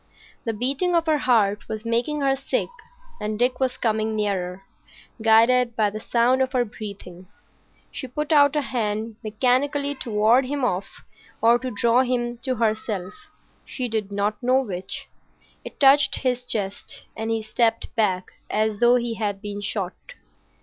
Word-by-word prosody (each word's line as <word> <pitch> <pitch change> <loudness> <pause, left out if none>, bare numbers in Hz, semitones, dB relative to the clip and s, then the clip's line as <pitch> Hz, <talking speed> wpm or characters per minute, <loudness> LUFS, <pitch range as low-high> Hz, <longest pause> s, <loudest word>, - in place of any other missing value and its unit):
The 225 - -1
beating 275 - 0
of 335 -1 +2
her 310 -2 +2
heart 210 -6 +2
was 220 0 -5
making 240 +6 0
her 270 -1 +2
sick, 270 0 -2 0.5
and 210 0 -3
Dick 250 +2 +1
was 260 -1 0
coming 220 -1 0
nearer, 195 -3 -2 0.6
guided 230 +2 +4
by 215 -3 +2
the 215 - -5
sound 245 +3 +2
of 260 +1 0
her 245 -2 +2
breathing. 200 -4 -9 0.6
She 260 - -6
put 300 +5 -4
out 290 -1 +5
a 300 - +2
hand 220 -3 -2
mechanically 260 +6 +1
to 260 -3 -8
ward 220 +5 +4
him 280 -1 -1
off 190 -4 -1 0.5
or 235 +1 +4
to 255 - -4
draw 235 +2 +3
him 240 -2 -1
to 260 -1 -1
herself, 215 -4 -1 0.5
she 255 -2 -4
did 215 -3 -3
not 205 +3 -1
know 255 +1 +3
which. 190 -5 -5 0.6
It - - -10
touched 280 0 +6
his 250 -1 -1
chest, 200 -4 -3
and 220 0 -4
he 225 -1 -1
stepped 225 +2 0
back 190 -5 0 0.2
as 215 -1 0
though 240 +1 +5
he 240 -1 0
had 210 -3 -2
been 205 0 -6
shot. 195 -3 -2
230 Hz, 165 wpm, -24 LUFS, 210-255 Hz, 0.6 s, touched